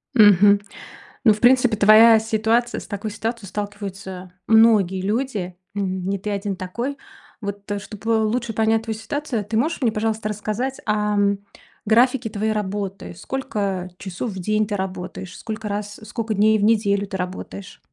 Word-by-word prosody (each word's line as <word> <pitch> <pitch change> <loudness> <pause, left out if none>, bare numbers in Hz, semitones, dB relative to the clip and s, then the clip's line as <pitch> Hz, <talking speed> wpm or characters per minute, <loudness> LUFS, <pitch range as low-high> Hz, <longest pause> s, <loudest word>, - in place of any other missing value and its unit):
Мгм, 205 -1 +6 0.6
ну, 215 - +7
в 210 - -7
принципе, 250 -2 +5
твоя 220 +2 +7
ситуация 225 +2 0
с - - -11
такой 205 +1 -4
ситуацией 225 -2 -4
сталкиваются 195 -3 -6 0.2
многие 215 -5 +5
люди, 205 -4 -2 0.2
н 190 -2 -2
не 200 0 0
ты 210 - -5
один 200 -1 -2
такой. 235 +10 -4 0.4
Вот, 200 0 -6
э, 205 - -1
чтобы 220 +2 -1
лучше 230 +1 -1
понять 225 +1 +2
твою 220 -1 -4
ситуацию, 235 -1 -3
ты 220 +1 -2
можешь 310 +5 0
мне, 230 -3 +2
пожалуйста, 215 0 -1
рассказать, 215 +5 -3
ам, 210 -1 +1 0.5
графике 240 +2 +3
твоей 215 +1 -1
работы? 195 -2 -4
Сколько 200 -8 -3
часов 190 +4 -5
в 190 - -7
день 215 +3 +1
ты 205 - -2
работаешь? 185 0 -6
Сколько 220 -1 -6
раз 205 0 -4
сколько 220 +1 -3
дней 215 +2 +4
в - - 0
неделю 205 -2 +2
ты 190 - -4
работаешь? 185 +1 -6
210 Hz, 155 wpm, -22 LUFS, 200-225 Hz, 0.6 s, ну